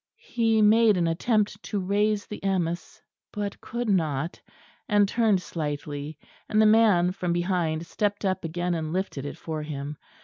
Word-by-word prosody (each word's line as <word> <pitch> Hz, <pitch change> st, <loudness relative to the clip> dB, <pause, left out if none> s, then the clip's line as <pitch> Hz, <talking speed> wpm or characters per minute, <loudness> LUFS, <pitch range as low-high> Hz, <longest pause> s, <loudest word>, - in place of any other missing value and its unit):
He 225 Hz, -2 st, +1 dB
made 215 Hz, -1 st, +5 dB
an 175 Hz, -, +2 dB
attempt 210 Hz, +4 st, 0 dB
to 210 Hz, -, -3 dB
raise 205 Hz, +2 st, +1 dB
the 210 Hz, -, -7 dB
amice 175 Hz, -3 st, -2 dB, 0.3 s
but 205 Hz, -1 st, -4 dB
could 240 Hz, 0 st, -4 dB
not, 160 Hz, -5 st, 0 dB, 0.5 s
and 205 Hz, -1 st, +4 dB
turned 210 Hz, -4 st, +2 dB
slightly; 145 Hz, -2 st, -4 dB, 0.3 s
and 215 Hz, -, +2 dB
the 220 Hz, -, +6 dB
man 215 Hz, -5 st, +5 dB
from 180 Hz, -2 st, -2 dB
behind 170 Hz, -2 st, 0 dB
stepped 205 Hz, +3 st, -2 dB
up 190 Hz, -1 st, 0 dB
again 175 Hz, +2 st, -2 dB
and 160 Hz, -2 st, -3 dB
lifted 180 Hz, -7 st, -3 dB
it -, -, -7 dB
for 155 Hz, -2 st, -5 dB
him. 150 Hz, -1 st, -5 dB
185 Hz, 160 wpm, -26 LUFS, 165-210 Hz, 0.5 s, the